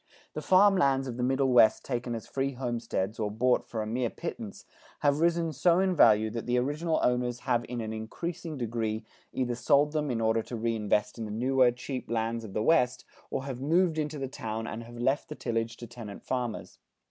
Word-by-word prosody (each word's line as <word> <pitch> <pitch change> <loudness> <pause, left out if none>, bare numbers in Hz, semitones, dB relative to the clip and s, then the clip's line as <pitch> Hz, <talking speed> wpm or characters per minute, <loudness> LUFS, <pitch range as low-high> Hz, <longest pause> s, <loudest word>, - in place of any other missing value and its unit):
The - - -4
farm 195 +1 +5
lands 135 -5 +2
of 120 -2 -5
the - - -3
Middle 135 +2 +2
West 120 -3 +5
taken 120 -2 -2
as 110 - -6
free 135 0 -2
homesteads 115 -5 -3
or 105 -1 0
bought 120 +4 +1
for 110 -2 -2
a - - -5
mere 120 +2 -1
pittance, 110 -2 -7 0.4
have 145 0 +3
risen 165 -1 +2
so 170 +5 +3
in 185 -1 +2
value 110 -6 +5
that 115 +1 -5
the 125 0 +2
original 150 +6 0
owners 125 0 0
have 120 -1 +1
in 120 -1 -3
an 110 0 -4
increasing 160 +9 -5
degree 115 -2 -2 0.3
either 125 -2 -1
sold 140 +4 +3
them 150 -1 -1
in 120 -3 -1
order 110 0 +2
to 120 - -7
reinvest 110 -1 0
in 115 - -3
the - - -6
newer 125 +4 +3
cheap 125 +1 -5
lands 115 0 -1
of 105 -3 -9
the 105 - 0
West, 125 -4 +2 0.2
or 135 - -3
have 130 -2 -5
moved 165 +2 +2
into 150 0 -2
the 135 -1 -3
town 110 -3 -5
and 115 +1 -6
have 120 +1 -11
left 135 +4 0
the 150 - -6
tillage 115 -2 -2
to 120 - -8
tenant 115 -3 -9
farmers. 125 -4 -4
125 Hz, 210 wpm, -29 LUFS, 115-140 Hz, 0.4 s, farm